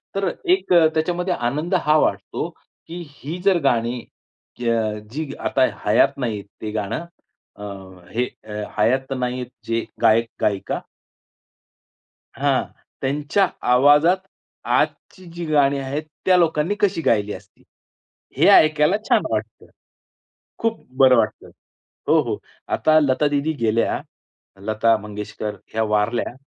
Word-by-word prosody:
तर 195 -2 +1 0.2
एक 375 - 0
त्याच्यामध्ये 170 +2 +2
आनंद 150 +8 -1
हा 150 +1 +5
वाटतो, - - -1 0.4
की 175 +2 -7
ही 145 +3 -7
जर 195 -3 +5
गाणी 120 -2 +1 0.6
क - - -3 0.5
जी 150 +3 -4
आता 130 - +2 0.2
हयात 125 +6 +3
नाहीत 110 -6 -3 0.2
ते 110 - -4
गाणं. 110 +9 -3 0.5
अ, 105 - -11 0.5
हे 120 +2 0 0.5
हयात 130 +5 +1
नाहीत 125 0 -2
हे - - -23 0.2
जे 115 0 0 0.2
गायक-गायिका. 110 -3 +1 1.6
हां, - - +2 0.4
त्यांच्या 145 +8 +1 0.2
आवाजात 145 +8 +5 0.5
आजची 185 - -1
जी 170 0 -5
गाणी 140 -3 +3
आहेत, 135 +3 -3 0.2
त्या 185 -1 +5
लोकांनी 165 +2 +2
कशी 200 -5 +1
गायली 105 -7 +1
असती? 95 +1 -14 0.7
हे - - +5
ऐकायला 155 +4 +5
छान - - +5
वाटतं. - - -4 0.9
खूप 230 0 -2
बरं 130 -1 +7
वाटतं. 110 -2 -1 0.6
हो, - - +5
हो. - - -3 0.4
आता 155 0 +4
लता 145 0 +2
दीदी 145 +2 0
गेल्या, 115 0 +1 0.6
लता 110 +1 +3
मंगेशकर 105 0 -6 0.2
ह्या 110 0 +1
वारल्या. 105 +3 0
135 Hz, 120 wpm, -22 LUFS, 115-160 Hz, 1.6 s, बरं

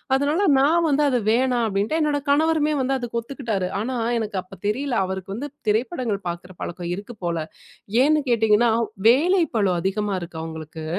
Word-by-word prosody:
அதனால 295 +8 +1 0.2
நான் 330 +4 +3
வந்து, 295 +1 +2
"அதை 250 -2 +1
வேணா" 250 +1 +2
அப்டின்ட்டேன். 210 +12 0
என்னோட 290 -1 +1
கணவருமே 305 +1 +3
வந்து 270 +1 0
அதுக்கு 235 -2 -3
ஒத்துக்கிட்டாரு. 225 -8 -3
ஆனா, 255 +3 -3 0.2
எனக்கு 210 -3 -3
அப்போ 185 - -14
தெரியல 260 +4 -1
அவருக்கு 190 +1 -5
வந்து 285 +5 -5 0.2
திரைப்படங்கள் 225 - -1
பார்க்கிற 175 +2 -7
பழக்கம் 175 0 -5
இருக்கு 205 +4 -9
போல. 165 -2 -2 0.6
ஏன்னு 305 +1 +3
கேட்டீங்கன்னா, 225 0 +4 0.4
வேலை 340 +8 +4
பழு 200 -4 +2
அதிகமா 195 +1 -1
இருக்கு 165 -1 -7
அவங்களுக்கு. 160 -1 -7
235 Hz, 160 wpm, -23 LUFS, 195-285 Hz, 0.6 s, கேட்டீங்கன்னா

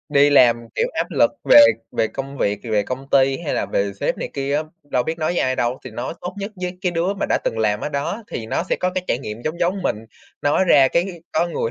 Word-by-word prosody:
Đi 145 0 +4
làm, 120 -4 +4
kiểu, 475 - +1
áp - - 0
lực - - +3
về - - +9 0.3
về 110 - +1
công 135 0 -6
việc, 100 0 0
về 105 -3 +1
công 130 +4 -6
ty 135 0 +3
hay 165 -3 -3
là - - -1
về 100 0 -1
sếp 100 - -2
này - - -4
kia 140 0 -2
á, 155 - 0 0.3
đâu 125 - +2
biết 160 +4 -4
nói 155 - 0
với - - -1
ai 130 0 0
đâu 120 +2 0
thì - - -7
nói 120 +7 -5
tốt 180 - -6
nhất 200 +2 -5
với 180 0 -4
cái 180 -2 0
đứa 175 +4 0
mà 195 - -2
đã - - +2
từng 115 - -1
làm 105 -1 +1
ở - - -2
đó 145 +10 -3
thì 110 - -5
nó 115 - -1
sẽ - - +1
có 180 - +1
cái 185 -1 -2
trải 120 - +1
nghiệm 110 -2 -7
giống 155 +4 -3
giống 185 +2 0
mình, - - 0 0.5
nói 145 +6 +3
ra 140 -7 +6
cái 175 +2 -1
có 165 +2 +2
người 160 -9 -2
140 Hz, 270 wpm, -21 LUFS, 120-175 Hz, 0.5 s, về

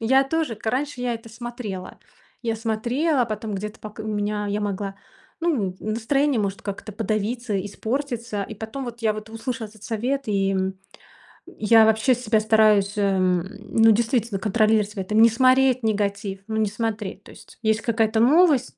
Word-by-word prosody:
Я 265 +4 +4
тоже, 310 -4 -1
к 215 - -14
раньше 260 +2 -1
я 245 -1 -1
это 230 0 -9
смотрела. 230 -5 -7 0.4
Я 230 -2 -1
смотрела, 245 +6 0
потом 215 -1 -4
где-то 210 +2 -6
пок 215 0 -10
у - - -4
меня 210 -1 -2
я 205 +1 -1
могла, 200 -1 -3 0.5
ну, 235 - 0
настроение 235 +5 +1
может 200 -1 -3
как-то 205 +1 -6
подавиться, 215 0 -2
испортиться. 235 0 -3
И 220 - -8
потом 220 +6 -6
вот 235 -1 -8
я 220 - +3
вот 215 +1 -8
услышала 225 +1 -4
этот 215 -1 -19
совет, 250 +4 -2
и, 195 -1 +1
м, 190 0 -1 0.7
я 220 +1 +4
вообще 220 +4 +3
себя 225 -3 +1
стараюсь, 215 -2 +4
э, 200 -2 +2
ну, 195 +5 +2
действительно 230 -2 +1
контролировать 215 0 +2
в - - -18
этом, 195 +3 0
не 230 - +8
смотреть 255 +2 +4
негатив, 200 -2 -1
ну, 220 -1 -2
не 215 -2 +1
смотреть. 210 -2 -4
То - - -14
есть - - -16
есть 220 0 +2
какая-то 225 -1 +1
новость, 280 +1 +4
220 Hz, 170 wpm, -23 LUFS, 205-240 Hz, 0.7 s, не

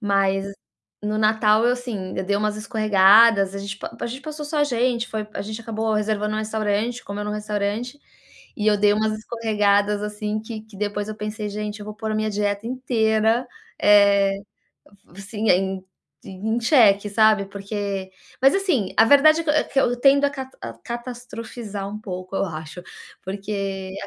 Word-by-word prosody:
Mas 195 -2 +1 0.6
no 210 +1 -2
natal 215 0 +3
eu, 245 - +4
assim, 230 -7 -5
eu 190 - -1
dei 200 +1 0
umas 210 0 0
escorregadas, 215 -1 +4
a 200 - -4
gente 200 0 -6
pa 230 - -8
a - - -3
gente 255 +3 -6
passou 305 0 -7
só 300 +1 -3
a 290 - +4
gente, 245 -2 0
foi 215 -1 -4
a - - -5
gente 215 +2 -6
acabou 220 0 -2
reservando 210 0 -1
um - - -1
restaurante, 220 +2 -1
comeu 205 +1 -5
num 210 - -3
restaurante, 210 +5 -3 0.6
e 215 - -2
eu 210 -1 +4
dei 205 0 +4
umas 215 +1 +1
escorregadas, 210 -2 +1
assim, 210 0 -3
que 220 0 -7
que 220 -2 -16
depois 205 +1 -3
eu 215 - -4
pensei: 210 0 -4
"Gente, 210 0 -5
eu - - -7
vou 215 - -7
pôr 220 0 -5
a - - -1
minha 215 0 0
dieta 205 +1 -2
inteira, 230 -1 +1 0.3
eh, 200 -1 +5 0.8
assim, 210 +3 -4
em 190 0 +1 0.4
em 220 +5 -3
cheque", 215 -6 +4
sabe. 215 -1 +4
Porque 200 -1 -5 0.3
mas, 270 - +6
assim, 350 - 0
a 225 - +7
verdade 310 +4 +6
é - - -14
que 300 - +1
eu 305 - +1
que 270 - +1
eu 245 - -13
tendo 280 +2 +5
a 280 - -1
ca 265 -2 -6
a 115 - -5
catastrofizar 235 - -7
um 210 +1 -6
pouco 185 -2 -6
eu - - +1
acho, 160 +1 -7 0.4
porque 195 -1 -4
215 Hz, 180 wpm, -22 LUFS, 200-230 Hz, 0.8 s, a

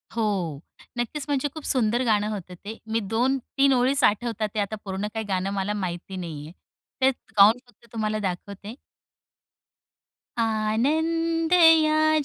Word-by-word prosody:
हो, 195 -10 -1 0.4
नक्कीच 265 +4 -3
म्हणजे 285 -1 0
खूप 315 - -8
सुंदर 240 -1 +1
गाणं 210 -2 +2
होतं 190 -4 -6
ते. 220 +2 -6
मी 225 +1 0
2-3 260 +5 +1
ओळीचं 260 +2 +3
आठवतात 220 0 -1
आहे, 210 - +1
आता 205 +2 -3
पूर्ण 195 +1 -3
काही 220 -1 -3
गाणं 190 -1 -1
मला 200 +1 -1
माहिती 185 -1 -4
नाहीये. 160 -4 -7 0.5
ते 260 - +6
गाऊन 220 -2 +4
फक्त 245 - -23
तुम्हाला 215 -1 -1
दाखवते. 200 +3 -5 1.6
आनंद 315 +10 +1
या 310 -2 +5
220 Hz, 130 wpm, -25 LUFS, 200-270 Hz, 1.6 s, ते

